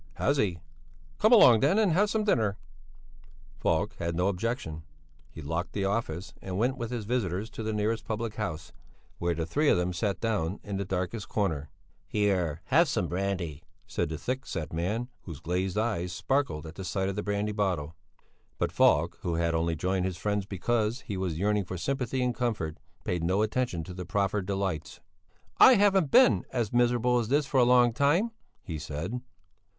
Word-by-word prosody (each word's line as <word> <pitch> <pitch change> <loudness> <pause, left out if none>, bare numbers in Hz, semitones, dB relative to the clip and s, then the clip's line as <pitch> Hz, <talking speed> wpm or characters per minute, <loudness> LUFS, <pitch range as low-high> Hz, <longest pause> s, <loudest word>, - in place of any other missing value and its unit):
"Has 140 +1 +1
he? 95 -9 +1 0.6
Come 215 - +4
along 125 - +8
then 145 - +3
and 215 -5 +3
have 200 +6 +3
some 215 0 0
dinner." 110 - +1 1.0
Falk - - +1
had 85 0 -2
no 90 +3 +2
objection; 95 - -3 0.5
he 80 +1 -10
locked 80 +5 -3
the 100 -1 -1
office 100 -3 -2
and 95 -1 -4
went 125 +5 +1
with 120 -3 -4
his 120 -4 -4
visitors 105 -3 -1
to - - -7
the 110 0 -2
nearest 110 +1 -1
public 110 0 -3
house, 85 -8 -4 0.5
where 85 0 0
the 80 0 -2
three 145 - +1
of - - +4
them 90 +1 0
sat 95 +2 -1
down 105 -5 -1
in 100 -1 -4
the 100 - -2
darkest 95 +4 -3
corner. 80 -9 -1 0.4
"Here, 90 -6 0
have 165 +5 +4
some 90 - 0
brandy," 90 -5 -2 0.2
said - - -2
the 80 - -4
thick 130 - -3
set 80 -1 -4
man, 105 +9 -1 0.2
whose 80 -6 -7
glazed 90 +3 -2
eyes 105 -6 -1
sparkled 90 - -1
at 80 - -8
the 95 - -7
sight 95 +1 -1
of 100 - -2
the 105 - -1
brandy 105 +1 -1
bottle. 90 -7 -1 0.6
But - - 0
Falk - - +3
who 85 -2 -1
had 85 0 +1
only 80 0 0
joined 90 +3 0
his 95 -2 -3
friends 100 +1 -1
because 110 +5 -1
he 105 - -5
was 90 -4 -2
yearning 105 +2 +1
for 90 +1 -5
sympathy 130 - -1
and 125 -1 +1
comfort, 110 -11 -2 0.2
paid 90 -2 -2
no 95 +5 +2
attention 110 -6 -1
to 90 - -8
the 90 0 -6
proffered 100 -1 0
delights. 95 -5 -3 0.6
"I 255 - +9
haven't 195 -6 +4
been 255 - +6
as 120 -4 -1
miserable 120 0 +3
as 115 - -2
this 145 +4 +2
for 135 -1 +1
a - - +6
long 120 -1 +5
time," 165 - +2 0.3
he 80 -4 -5
said. 80 +12 -4
100 Hz, 190 wpm, -28 LUFS, 90-120 Hz, 1.0 s, I